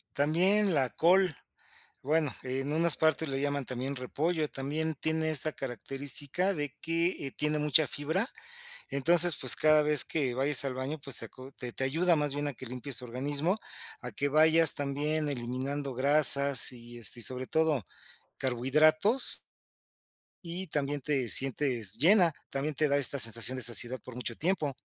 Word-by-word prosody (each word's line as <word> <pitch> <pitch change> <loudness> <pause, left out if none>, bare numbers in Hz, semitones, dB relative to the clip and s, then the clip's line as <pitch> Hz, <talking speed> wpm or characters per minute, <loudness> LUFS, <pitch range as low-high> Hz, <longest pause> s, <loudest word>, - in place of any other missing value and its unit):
También 180 +6 -1
la 130 -3 -2
col, 180 -1 0 0.7
bueno, 150 0 -3
en 135 +3 -6
unas 165 0 +2
partes 160 -1 -2
le 135 0 -5
llaman 145 -1 -4
también 130 +2 -6
repollo, 155 +5 -5
también 155 +4 -6
tiene 160 +2 -4
esta 155 +1 +2
característica 140 - -3
de 145 -2 -8
que, 165 -1 -4
eh, 135 - -9
tiene 150 0 -3
mucha 150 +1 0
fibra, 160 - -5 0.6
entonces, 170 +4 +5
pues, 130 - +5
cada 155 -1 +1
vez 150 -1 +6
que 135 -6 -4
vayas 140 +1 -1
al 135 -2 -5
baño, 135 +4 -7
pues, 140 -4 +2
te - - -6
aco 130 +4 -16
te 125 -3 -9
te 130 - -5
ayuda 165 +5 -1
más 145 -2 -3
bien 145 0 -5
a - - -5
que 130 +1 -13
limpies 125 +2 -3
tu 125 - -8
organismo, 145 - -3 0.4
a 125 - -9
que 140 +7 -4
vayas 160 +2 +6
también 145 +2 -4
eliminando 135 +2 -7
grasas 140 0 +6
y, 120 0 -14
este, 120 +1 +2
y - - -2
sobre 130 +1 -1
todo, 155 - -3 0.5
carbohidratos 155 - +4 1.0
y 175 +3 -7
también 145 -1 -4
te 135 -4 -3
sientes 125 -5 +1
llena, 175 +1 +2 0.2
también 145 +2 -6
te 155 +2 -1
da 140 - -1
esta 140 0 +3
sensación 115 +2 +5
de 130 - -4
saciedad 120 +2 +2
por 125 - -14
mucho 120 -1 -7
tiempo. 160 -5 -4
145 Hz, 165 wpm, -26 LUFS, 130-155 Hz, 1.0 s, vez